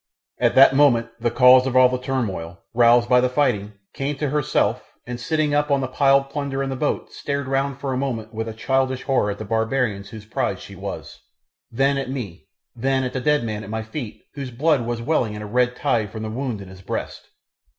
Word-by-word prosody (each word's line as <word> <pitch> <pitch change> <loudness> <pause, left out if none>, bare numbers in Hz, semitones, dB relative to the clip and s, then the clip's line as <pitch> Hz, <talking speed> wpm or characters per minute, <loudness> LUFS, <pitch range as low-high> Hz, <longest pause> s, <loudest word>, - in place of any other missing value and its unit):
At - - +2
that 135 0 +7
moment 120 -5 +4
the 120 +1 +1
cause 125 +2 +6
of 130 - -2
all 130 0 +8
the 125 0 -2
turmoil, 100 -10 -3 0.2
roused 120 0 +5
by 125 0 +5
the 125 - +2
fighting, 125 -7 0 0.2
came 140 +1 -3
to 145 -1 -2
herself, 150 -2 +1 0.2
and 125 0 -6
sitting 155 +3 0
up 150 +1 +1
on 140 -1 +3
the 130 - -1
piled 135 +1 +3
plunder 140 -2 -2
in 135 - -3
the - - -2
boat 145 +3 -2
stared 140 -1 -3
round 135 0 -1
for 135 -1 -2
a - - -1
moment 115 -5 -3
with 110 +1 -3
a - - -6
childish 130 +3 0
horror 130 -6 +1
at 100 - -3
the 110 - -6
barbarians 110 -2 -1
whose 110 -2 -10
prize 110 - -2
she - - -11
was, - - -7 0.5
then 135 +3 +1
at 135 - -4
me, 100 -9 -6 0.3
then 130 +2 0
at 125 - -3
the 130 - -2
dead 150 -1 +2
man 110 -2 -4
at 95 - -9
my 110 0 -3
feet 110 0 -7
whose 140 -2 -5
blood 135 0 +1
was 120 -1 -3
welling 120 -7 0
in 105 - -6
a - - -6
red 125 +3 +1
tide 110 -4 0
from 110 +2 -7
the 110 - -4
wound 120 -3 -3
in 100 - -10
his 95 0 -13
breast. - - -5
125 Hz, 225 wpm, -22 LUFS, 110-135 Hz, 0.5 s, all